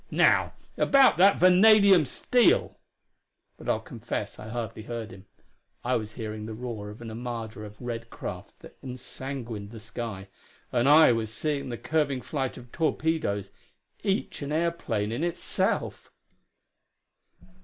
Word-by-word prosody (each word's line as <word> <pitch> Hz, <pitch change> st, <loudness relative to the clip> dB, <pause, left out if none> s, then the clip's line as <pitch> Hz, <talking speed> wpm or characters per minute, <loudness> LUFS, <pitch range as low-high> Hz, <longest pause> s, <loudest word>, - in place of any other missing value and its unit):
Now, -, -, +3 dB, 0.2 s
about 275 Hz, -1 st, +5 dB
that 195 Hz, +3 st, +6 dB
vanadium 195 Hz, -1 st, +6 dB
steel 245 Hz, -, +2 dB, 0.4 s
" -, -, -52 dB
But -, -, -7 dB
I'll -, -, +2 dB
confess -, -, -5 dB
I 110 Hz, -, -8 dB
hardly 115 Hz, -1 st, -5 dB
heard 115 Hz, -1 st, -6 dB
him; 95 Hz, +1 st, -13 dB, 0.6 s
I 125 Hz, +1 st, +1 dB
was 110 Hz, -1 st, -3 dB
hearing 110 Hz, -2 st, -5 dB
the 110 Hz, -, -6 dB
roar 110 Hz, -3 st, -6 dB
of 105 Hz, +3 st, -11 dB
an 115 Hz, -, -7 dB
armada 115 Hz, -2 st, -6 dB
of 105 Hz, 0 st, -11 dB
red 115 Hz, -1 st, -5 dB
craft -, -, -8 dB
that -, -, -14 dB
ensanguined 125 Hz, -4 st, -6 dB
the 115 Hz, 0 st, -10 dB
sky, 110 Hz, -3 st, -6 dB, 0.4 s
and 120 Hz, +2 st, +2 dB
I 155 Hz, -2 st, +8 dB
was 115 Hz, -2 st, -1 dB
seeing 140 Hz, +3 st, -2 dB
the 120 Hz, -, -4 dB
curving 145 Hz, -4 st, 0 dB
flight 135 Hz, -4 st, -3 dB
of 125 Hz, -1 st, -13 dB
torpedoes, 155 Hz, -, -1 dB, 0.5 s
each 195 Hz, -5 st, -1 dB
an 145 Hz, 0 st, -4 dB
airplane 155 Hz, -10 st, -1 dB
in 120 Hz, +8 st, -2 dB
itself.... 175 Hz, 0 st, -1 dB
120 Hz, 145 wpm, -27 LUFS, 110-155 Hz, 0.6 s, I